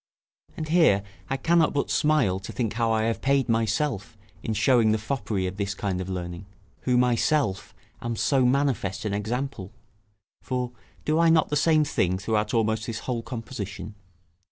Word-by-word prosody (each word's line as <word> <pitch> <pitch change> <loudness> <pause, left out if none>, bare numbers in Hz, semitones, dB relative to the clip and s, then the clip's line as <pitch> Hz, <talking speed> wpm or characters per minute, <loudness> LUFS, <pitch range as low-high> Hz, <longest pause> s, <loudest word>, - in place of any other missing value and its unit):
And 155 -1 -4
here 155 - +4 0.3
I 135 - 0
cannot 165 +3 +3
but 140 - 0
smile 150 -12 +2
to 95 - -8
think 115 -5 -2
how 115 0 +1
I 110 0 +2
have 115 0 -1
paid 135 -1 +2
myself 115 0 -1 0.2
in 110 - -2
showing 110 0 +4
the - - +2
foppery 110 -4 -2
of 90 +1 -4
this 100 0 -2
kind 95 -3 -2
of 95 - -5
learning, 90 0 -5 0.4
who 125 -1 +3
myself 125 -2 +1 0.3
am 120 0 -3
so 135 +3 +2
manifest 125 -6 +1
an 105 - -1
example; 110 -1 -3 0.7
for, 125 -1 -2 0.3
do 155 +1 +2
I 170 0 +5
not 160 -1 +4
the 150 - 0
same 155 +1 +4
thing 95 -10 0
throughout 105 +2 -1
almost 110 -2 0
this 115 -2 -4
whole 120 -3 -2
composition? 110 -4 -6
115 Hz, 170 wpm, -26 LUFS, 100-135 Hz, 0.7 s, I